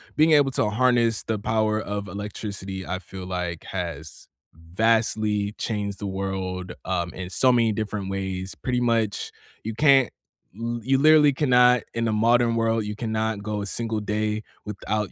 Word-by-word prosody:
being 155 Hz, +1 st, +4 dB
able 145 Hz, -3 st, +5 dB
to 115 Hz, -4 st, +1 dB
harness 120 Hz, 0 st, +2 dB
the 110 Hz, -, -2 dB
power 110 Hz, +1 st, 0 dB
of 100 Hz, -1 st, -4 dB
electricity, 100 Hz, -1 st, -6 dB
I 95 Hz, +1 st, -2 dB
feel 95 Hz, 0 st, -9 dB
like, 90 Hz, -2 st, -4 dB
has 85 Hz, -5 st, -6 dB, 0.3 s
vastly 105 Hz, +4 st, 0 dB
changed 105 Hz, -3 st, -3 dB
the 100 Hz, -, -4 dB
world, 95 Hz, -1 st, -4 dB
um, 90 Hz, -2 st, -1 dB
in 90 Hz, -1 st, -6 dB
so 130 Hz, +6 st, +3 dB
many 115 Hz, -3 st, +3 dB
different 105 Hz, -2 st, -3 dB
ways. 95 Hz, -1 st, -4 dB
Pretty 125 Hz, -1 st, -1 dB
much, 115 Hz, -4 st, 0 dB, 0.3 s
you 110 Hz, -, -4 dB
can't 135 Hz, 0 st, +5 dB, 0.5 s
y 115 Hz, +2 st, -3 dB
you 135 Hz, +3 st, +2 dB
literally 150 Hz, +1 st, +6 dB
cannot- 125 Hz, -3 st, +4 dB
in 115 Hz, 0 st, -1 dB
a -, -, +1 dB
modern 115 Hz, +2 st, +3 dB
world- 115 Hz, -1 st, +1 dB
you 105 Hz, -, -4 dB
cannot 110 Hz, -2 st, -2 dB
go 105 Hz, 0 st, -3 dB
a -, -, -4 dB
single 115 Hz, 0 st, -2 dB
day 105 Hz, +1 st, -1 dB, 0.2 s
without 105 Hz, -1 st, -3 dB
110 Hz, 165 wpm, -24 LUFS, 95-115 Hz, 0.5 s, literally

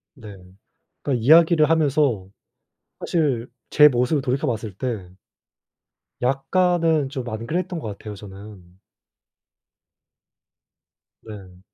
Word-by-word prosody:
네. 110 Hz, -7 st, -11 dB, 0.7 s
그러니까 125 Hz, -5 st, -2 dB
이야기를 160 Hz, +1 st, +5 dB
하면서 145 Hz, -10 st, +1 dB, 0.7 s
사실 140 Hz, -8 st, -1 dB, 0.2 s
제 150 Hz, 0 st, +7 dB
모습을 125 Hz, +3 st, +1 dB
돌이켜봤을 125 Hz, -6 st, -2 dB
때 110 Hz, -8 st, -4 dB, 1.1 s
약간은 160 Hz, +3 st, +1 dB
좀 130 Hz, -3 st, -6 dB
안 110 Hz, 0 st, -6 dB
그랬던 180 Hz, +1 st, -3 dB
것 115 Hz, -, -7 dB
같아요 105 Hz, -1 st, -9 dB
저는. 95 Hz, -2 st, -13 dB, 2.4 s
네. 95 Hz, -4 st, -12 dB
130 Hz, 200 characters per minute, -22 LUFS, 110-155 Hz, 2.4 s, 제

